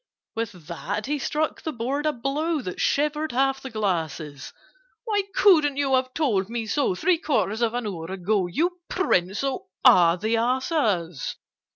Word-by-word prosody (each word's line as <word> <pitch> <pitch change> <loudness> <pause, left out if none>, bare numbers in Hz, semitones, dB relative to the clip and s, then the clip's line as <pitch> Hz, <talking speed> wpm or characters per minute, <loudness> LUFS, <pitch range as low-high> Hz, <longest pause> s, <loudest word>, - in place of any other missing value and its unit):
With 200 -8 -5
that 195 +6 -4
he 295 +1 -1
struck 305 +4 -1
the 315 - -3
board 275 +4 -2
a - - +3
blow 295 +5 -1
That 180 - -5
shivered 300 +1 +1
half 270 +1 +1
the 265 - -6
glasses. 165 - -3 0.5
"Why 420 -3 +1
couldn't 310 -8 +5
you 275 -2 +1
have 255 0 +2
told 215 -11 +1
me 230 -1 -3
so 245 -4 0
Three 345 - +2
quarters 240 - 0
of 235 0 +1
an 245 -2 -2
hour 175 -6 -4
ago, 190 +1 0
You 345 - -1
prince 195 - +1
of 270 -1 -1 0.2
all 170 -1 +7
the 220 +5 0
asses? 225 - 0
240 Hz, 165 wpm, -25 LUFS, 190-295 Hz, 0.5 s, all